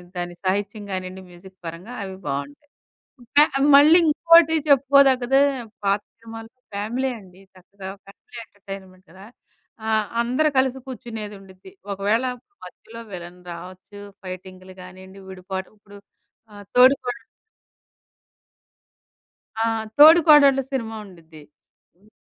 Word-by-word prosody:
దాని 175 0 -5
సాహిత్యం 200 +2 -2
గానియ్యండి 185 0 -6
మ్యూజిక్ 185 +2 -16
పరంగా 170 +8 -8
అవి 190 -1 -7
బావుంటాయి. 140 - -6 0.5
ఇంక 240 +4 -11 0.2
అవి 280 +2 +2
మళ్ళీ 310 +4 +7
ఇంకోటి 330 +1 +5
చెప్పుకోదగ్గదే 270 -1 +4 0.4
పాత 200 +1 +1 0.2
సినిమాలు 225 0 -11 0.2
ఫ్యామిలీ 235 +6 -2
అండి 185 -1 -18 0.2
చక్కగా. 190 +1 -13 0.2
ఫ్యామిలీ 200 +4 -16
ఎంటర్‌టైన్‌మెంట్‌‍ 195 -2 -12
కదా! 190 +3 -15 0.6
ఆ! - - -2 0.3
అందరు 255 +6 +1
కలిసి 265 0 +1
కూర్చునేదుండిద్ది. 210 - -10 0.2
ఒకవేళ 205 +5 0 0.4
మధ్యలో 230 +1 -12
విలన్ 175 0 -9
రావచ్చు, 185 +4 -11 0.2
ఫైటింగ్లు 185 0 -10
గానీయండి, 190 +1 -14
విడిపాటు 190 0 -7
ఇప్పుడు 205 0 -16 0.6
ఆహ్, 205 -1 -12
'తోడికోడళ్ళు' 250 0 +3 2.4
ఆ! - - +2 0.3
'తోడికోడళ్ళు' 295 -3 +7
సినిమా 225 -4 -4
ఉండిద్ది. 165 -4 -16 0.5
హ్మ్, 205 +4 -27
205 Hz, 105 wpm, -22 LUFS, 185-255 Hz, 2.4 s, మళ్ళీ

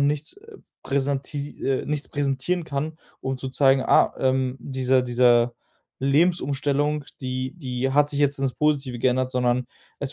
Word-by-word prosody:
nichts, 145 +2 0
äh, 430 +1 -15 0.3
präsenti 140 +1 -3
äh, 135 -1 0
nichts 150 -1 -2
präsentieren 145 +5 -1
kann, 155 +2 -4 0.2
um 130 -1 -3
zu 130 - -5
zeigen: 135 0 +4
„Ah, - - +4
ähm, 130 0 +1
diese 130 -1 +1
diese 120 -1 +3 0.4
Lebensumstellung, 145 -1 +1 0.2
die 130 0 -3
die 130 -3 -2
hat 145 +1 +3
sich 145 0 0
jetzt 145 -1 +2
ins 135 -2 0
Positive 140 -5 0
geändert“, 130 +1 +1
sondern 125 -1 +1 0.3
es 140 -1 -4
135 Hz, 150 wpm, -24 LUFS, 130-145 Hz, 0.4 s, zeigen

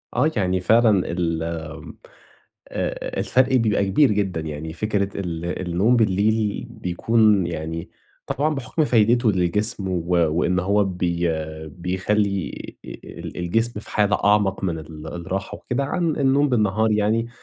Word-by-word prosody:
آه، 150 +6 +3
يعني 95 -3 +1
فعلًا 110 -2 +3
ال 85 -2 -1
آمم 80 -2 -6 0.7
آآ - - -3
الفَرق 130 +1 +2
بيبقى 110 -4 +2
كبير 115 +7 +4
جدًا، 95 -5 -1
يعني 80 +1 -6
فكرة 100 +1 -1
ال 85 -3 -4 0.2
النوم 100 +8 +3
بالليل 105 0 +1
بيكون 105 +1 +2
يعني 80 0 -5 0.4
طبعًا 150 +3 0
بحُكْم 150 +4 -1
فايدته 115 -1 +3
للجسم 95 +3 0
و 90 -2 -1
وإن 85 +2 +2
هو 100 +2 +2
بي 90 -2 -1 0.4
بيخلّي 95 +3 -1 0.3
آآ - - -8
ال - - -9
الجسم 110 +6 0
في - - -6
حالة 105 -2 +2
أعمق 100 -2 +2
من 85 -4 -1
ال 80 0 -10
الراحة 95 +4 -4
وكده، 130 +3 -2
عن 165 +3 -1
النوم 140 0 +3
بالنهار 110 -2 +2
يعني 110 +2 +1
100 Hz, 140 wpm, -22 LUFS, 85-110 Hz, 0.7 s, كبير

